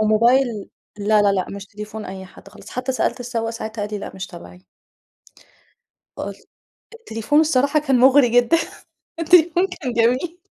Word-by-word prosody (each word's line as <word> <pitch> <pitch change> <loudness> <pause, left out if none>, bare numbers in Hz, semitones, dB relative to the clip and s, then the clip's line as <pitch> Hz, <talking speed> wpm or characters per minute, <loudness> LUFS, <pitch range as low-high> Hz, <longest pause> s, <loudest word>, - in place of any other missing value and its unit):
وموبايل 230 +5 +4 0.5
لا، 210 +1 +3
لا، 200 -1 +3
لأ 185 -2 -1
مش 200 0 -8
تليفون 210 +1 -8
أي 190 0 -8
حد 185 - -16
خالص، 210 +1 -14
حتى 255 +1 -3
سألت 255 - -1
السواق 230 -2 -3
ساعتها 220 -1 -6
قال 205 - -4
لي - - -3
لأ - - -7
مش 190 0 -6
تبعي. 180 0 -13 1.5
فقل - - -5 0.6
التليفون 290 - 0
الصراحة 290 -1 +2
كان 270 -4 +1
مغري 265 0 +6
جدًا، 245 +7 +4 0.6
التليفون 350 +2 +4
كان 320 -10 -5
جميل. 255 +10 0
235 Hz, 155 wpm, -21 LUFS, 210-280 Hz, 1.5 s, مغري